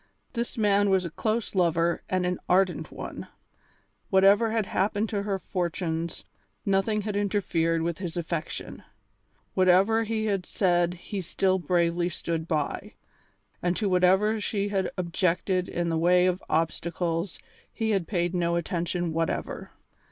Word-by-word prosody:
This 235 -1 -3
man 205 -2 +3
was 190 -2 +3
a 170 - -5
close 220 +5 -1
lover 170 -2 +2
and 185 -1 +1
an 180 0 -1
ardent 185 0 +2
one. - - -7 0.8
Whatever 200 +4 +5
had 220 -2 0
happened 205 +3 0
to 205 -2 -1
her 200 -1 -1
fortunes, 170 -2 -3 0.4
nothing 200 +2 +1
had 205 0 -3
interfered 180 -5 +1
with 170 0 -2
his 180 -2 -5
affection; 165 -1 -4 0.7
whatever 190 +5 +4
he 220 0 -1
had 195 -4 -1
said 175 -2 +2
he 190 +3 -5
still 190 +2 +1
bravely 175 +1 +1
stood 165 -2 -3
by, 155 -4 -2 0.7
and 175 0 0
to 215 - 0
whatever 190 +4 +3
she 205 -1 -1
had 195 -2 0
objected 180 +1 0
in 170 0 -1
the 165 -1 0
way 180 +2 +4
of 185 0 +1
obstacles 165 +2 -1 0.3
he 220 -1 -1
had 195 -5 0
paid 175 -3 0
no 170 -1 +1
attention 170 0 -1
whatever. 165 0 -2
180 Hz, 145 wpm, -27 LUFS, 170-200 Hz, 0.8 s, Whatever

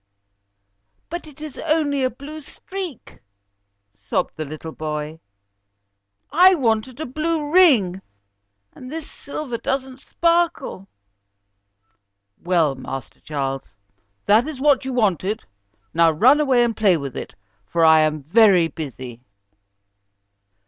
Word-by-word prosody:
"But 345 -1 -5
it 300 -1 -15
is 305 -2 -8
only 300 -3 0
a 255 - +2
blue 285 +6 -10
streak," 365 - -8 0.8
sobbed 100 - -2
the 155 - -4
little 155 +2 -8
boy. 155 0 -5 1.1
"I 365 +5 +6
wanted 235 -2 -1
a 315 - -3
blue 305 +2 -2
ring, 240 - +4 0.7
and 255 +1 -11
this 320 -1 -6
silver 280 -4 -6
doesn't 265 -1 -3
sparkle." 335 - 0 1.5
"Well, 170 -5 +1
Master 135 0 -8
Charles, 135 -3 -3 0.6
that 220 +6 +4
is 305 -4 -6
what 280 -1 +3
you 265 - -3
wanted, 210 -3 0 0.5
now 165 0 +5
run 245 - +4
away 260 -5 +3
and 235 -2 0
play 200 -5 +3
with 140 -4 -6
it, - - -7 0.3
for 165 -1 +2
I 160 0 +7
am 155 -1 +1
very 185 +1 +5
busy." 130 -7 -8
235 Hz, 120 wpm, -21 LUFS, -, 1.5 s, I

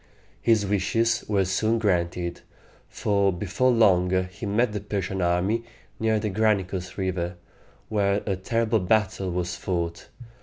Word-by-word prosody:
His 110 -3 +3
wishes 115 +4 +1
were 100 -3 +2
soon 110 +5 +1
granted, 90 -4 -1 0.5
for 100 -1 +1
before 100 +8 0
long 100 -7 +4 0.2
he 100 +3 -6
met 110 +3 +2
the 105 - -3
Persian 95 -2 -3
army 90 +6 +1 0.4
near 110 -1 +2
the 105 -1 -2
Gra 110 +2 +3
ni´cus 95 -1 -6
River, 90 -2 -2 0.5
where 100 -1 +1
a 100 - 0
terrible 115 +3 0
battle 95 -1 +1
was 90 0 -2
fought. 85 -1 -3
100 Hz, 140 wpm, -25 LUFS, 90-110 Hz, 0.5 s, long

